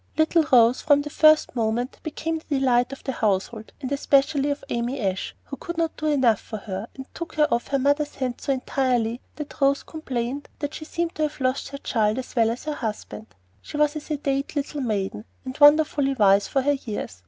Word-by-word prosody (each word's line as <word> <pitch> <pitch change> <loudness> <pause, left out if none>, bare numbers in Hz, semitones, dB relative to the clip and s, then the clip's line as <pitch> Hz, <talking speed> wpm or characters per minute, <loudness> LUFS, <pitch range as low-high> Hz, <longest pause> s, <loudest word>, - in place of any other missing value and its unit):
Little 315 +1 +4
Rose 240 -1 +5
from 290 -2 +4
the 295 - -7
first 310 -3 +4
moment 235 +2 -1
became 320 +1 -3
the 300 -3 -2
delight 250 -1 +2
of 275 - -9
the 265 - -2
household, 215 0 -1
and 265 -1 -4
especially 280 0 +2
of 285 0 -3
Amy 240 +3 -2
Ashe, 190 -4 -2
who 275 - -8
could 345 +5 -6
not 330 -1 0
do 310 - -3
enough 260 -8 +3
for 215 - -7
her, 195 +1 -6
and 265 - -8
took 335 - -7
her 300 -1 +4
off 235 - -1
her 275 - +1
mother's 285 +2 +1
hands 255 -2 -4
so - - +1
entirely 250 -3 0
that 300 -1 -8
Rose 275 0 +3
complained 270 -3 -4
that 290 0 -4
she 310 - -7
seemed 340 +1 -2
to - - -5
have 300 -1 -1
lost 255 +1 0
her 280 - -6
child 220 -5 0
as 260 - -6
well 225 -2 +4
as 235 +2 -4
her 305 - -3
husband. 220 -3 -5 0.3
She 295 - -7
was 300 0 +2
a - - -2
sedate 280 -2 -2
little 290 0 -2
maiden, 210 -4 -2 0.2
and 260 0 -5
wonderfully 290 -2 +5
wise 200 -3 +4
for 270 - 0
her 290 - +3
years. 215 - -5
270 Hz, 210 wpm, -24 LUFS, 235-295 Hz, 0.3 s, Rose